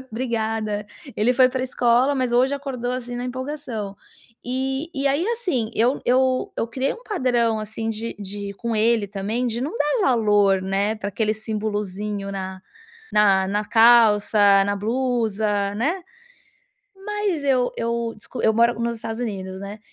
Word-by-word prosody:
obrigada. 220 -4 -2 0.3
Ele 225 +4 +3
foi 255 0 +6
para 255 0 -2
escola, 250 +2 +2
mas 255 -2 -1
hoje 255 +3 +3
acordou, 255 -3 -4
assim, 245 -1 -5
na 245 - -4
empolgação. 250 -6 -5 0.5
E 265 +4 -2
e 275 -1 -1
aí, 285 +5 +1
assim, 355 - -1
eu 245 +5 +2
eu 255 +1 +2
eu - - -1
criei 260 +3 -1
um 470 - -14
padrão, 240 - +1
assim, 220 +1 -5
de 225 +1 -5
de 200 0 -5
com 230 +3 -3
ele 220 -1 +3
também 210 +5 -2
de 235 0 -2
não 285 +6 -3
dar 295 +11 +1
valor, 205 - +3
né, 200 +3 0
para 200 - -4
aquele 215 +2 0
simbolozinho 210 -2 -3
na 190 -1 -5 0.5
na 195 -2 +4
na 205 +2 -1
calça, 210 -3 +5
na 200 0 0
blusa, 215 -3 0
né. 325 - -1 1.0
Mas 415 -7 -1
eu 255 -3 +2
eu 230 0 -1
desc 210 - -17
eu 220 - +4
moro 235 +1 +3
nos 235 0 -1
Estados 225 +1 -5
Unidos, 190 -4 -4
né, 200 +2 -7
230 Hz, 155 wpm, -23 LUFS, 210-255 Hz, 1.0 s, foi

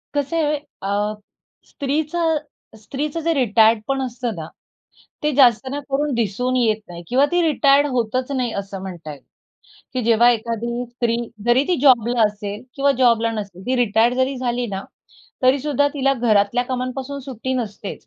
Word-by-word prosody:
कसं 290 +3 -1
आहे 300 0 +1 0.3
अ, 205 +2 0 0.5
स्त्रीच 290 +3 -2 0.7
स्त्रीचं 290 +7 -4
जे 330 +1 +1
रिटायर्ड 225 -4 +4
पण 270 0 0
असतं 245 -3 -3
ना, 160 -2 -6 0.8
ते 300 0 +1
जास्त 255 -1 +5
ना 285 +2 -3
करून 285 +1 0
दिसून 235 +3 -1
येत 220 -3 +2
नाही 170 -1 -9
किंवा 265 +3 +3
ती 350 - +3
रिटायर्ड 285 -2 +4
होतच 255 +2 -1
नाही 250 -4 -1
असं 195 -1 -8
म्हणता 175 -5 -7
येईल. 140 - -13 0.7
की 255 - -2
जेव्हा 235 +1 +5
एखादी 235 +1 -2
स्त्री 240 -1 -1 0.3
जरी 240 +3 +4
ती 360 - +2
जॉबला 245 -4 +4
असेल 205 -1 -2
किंवा 280 0 +2
जॉबला 230 -2 +3
नसेल 200 -4 -6
ती 255 +1 +1
रिटायर्ड 235 0 +3
जरी 260 +1 0
झाली 245 -1 -1
ना, 195 -3 -4 0.6
तरी 255 +2 +4
सुद्धा 285 0 +1
तिला 275 -1 +2
घरातल्या 230 -1 +2
कामांपासून 255 +2 -4
सुट्टी 260 -1 -5
नसतेच. 210 -4 -5
245 Hz, 160 wpm, -21 LUFS, 220-275 Hz, 0.8 s, जास्त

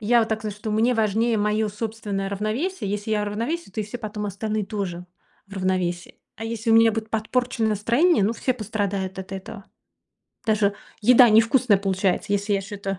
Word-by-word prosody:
Я 235 +3 +4
вот 225 - 0
так 220 0 -1
знаю, 210 -2 -4
что 210 +1 -5
мне 225 +4 +3
важнее 225 +1 +1
моё 210 +1 +1
собственное 210 -2 -4
равновесие. 215 - -2
Если 205 +1 -3
я 210 -1 +1
в - - -2
равновесии, 235 +7 -3
то 215 - -4
и 210 - -2
все 215 +4 -6
потом 210 -2 -5
остальные 210 +1 -2
тоже 180 -4 -4 0.4
в 195 - -12
равновесии. 185 -2 -2 0.2
А 225 - -6
если 225 0 -2
у - - +6
меня 225 0 +6
будет 220 0 -4
подпорчено 230 +1 0
настроение, 230 - +3
ну, 220 - +1
все 255 +2 -1
пострадают 200 -4 -3
от 190 - -10
этого. 195 +1 -8 0.8
Даже 210 -2 +2 0.3
еда 245 +1 +7
невкусная 225 +1 +4
получается, 195 0 0
если 205 +1 +1
я 195 - +1
что-то 195 -1 -5
215 Hz, 190 wpm, -24 LUFS, 200-225 Hz, 0.8 s, еда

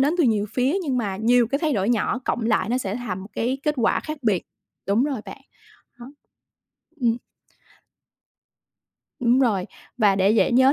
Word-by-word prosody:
đến 290 +5 +3
từ 335 - +4
nhiều 215 -4 +2
phía 260 +5 +1
nhưng 270 -6 -1
mà 200 -5 -2
nhiều 235 +3 +3
cái 275 +4 -1
thay 310 -1 0
đổi 200 -4 0
nhỏ 235 0 +1
cộng 235 - -1
lại 215 -3 +1
nó 250 +2 +1
sẽ 195 -5 -3
thành 205 -7 -5
một 195 - -10
cái 250 +5 -1
kết 300 - 0
quả 235 - +2
khác 305 -1 -6
biệt. 210 -7 +1 0.4
Đúng 210 +7 +2
rồi 270 -7 -2
bạn, - - -10 0.6
đó. 240 - -9 0.9
Ừm. 235 -1 +2 2.0
Đúng 245 +1 +3
rồi, 210 -8 +1 0.3
và 205 -3 +4
để 195 +1 +3
dễ 225 +3 +3
nhớ 260 +3 +5
235 Hz, 185 wpm, -23 LUFS, 210-260 Hz, 2.0 s, nhớ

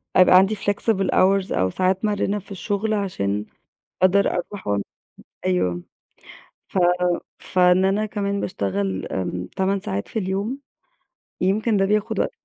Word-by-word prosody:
أبقى 185 0 +7
عندي 195 +3 +4
flexible 200 -1 0
hours 195 0 +3
أو 95 0 +1
ساعات 185 - 0
مَرِنة 205 0 0
في 200 - -16
الشُغل 205 +3 -2
عشان 105 - -1 0.6
أقدر 195 +2 +4
أروح 190 +3 -5
وعم 100 -1 0 0.6
أيوه. 90 -1 0 0.9
ف - - -3 0.6
فإن 180 0 +3
أنا 200 +3 +1
كمان 200 -1 -2
باشتغل 100 - -2
آمم 90 -1 -3
8 195 +1 +1
ساعات 100 - -3
في - - -3
اليوم، 200 +6 -2 0.8
يمكن 210 +4 +2
ده 195 - +3
بياخُد 210 +1 0
وقت - - 0
190 Hz, 135 wpm, -22 LUFS, -, 0.9 s, أبقى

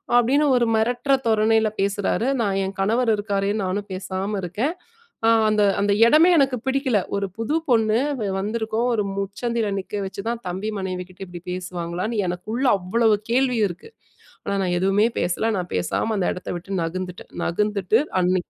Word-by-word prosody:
அப்பிடின்னு 265 +5 +4
ஒரு 240 - +3
மிரட்டுற 245 +5 +1
தோரணையில 220 0 +3
பேசுறாரு. 200 +4 0
நான் 200 -3 0
என் 190 - -4
கணவர் 225 +4 +2
இருக்காரேன்னு 205 0 -1
நானும் 200 +2 -2
பேசாம 190 +2 -3
இருக்கேன். 215 - -1 0.5
அ - - +6 0.2
அந்த, 210 -1 +3 0.2
அந்த 205 0 +2 0.2
இடமே 315 +7 +6
எனக்கு 270 -3 +3
பிடிக்கல. 265 -4 +2 0.2
ஒரு 200 0 0
புது 230 +7 -1
பொண்ணு 225 -2 +3 0.2
வ 210 - -2
வந்திருக்கும், 220 +3 -1
ஒரு 215 -2 +1
முச்சந்தியில 220 +3 -2
நிக்க 200 +2 -5
வச்சுதான், 225 +5 -4
தம்பி 190 +5 -3
மனைவிக்கிட்ட 185 0 -5
இப்பிடி 175 -1 -9
பேசுவாங்களான்னு 180 +4 -3
எனக்குள்ள 215 +9 -3
அவ்ளோ 220 +6 +1 0.2
கேள்வி 250 -1 +2
இருக்கு. 175 - -10 0.6
ஆனா 200 - -1
நான் 180 -1 0
எதுவுமே 195 +4 +3
பேசல. 205 +6 0
நான் 180 -1 -4
பேசாம 90 - -1
அந்த 185 - 0
இடத்த 180 - -8
விட்டு 190 +2 -4
நகர்ந்துட்டேன் 180 +2 -6
நகர்ந்துட்டு 210 +3 +1 0.2
அன்னக்கி 180 0 0
205 Hz, 155 wpm, -23 LUFS, 185-230 Hz, 0.6 s, அ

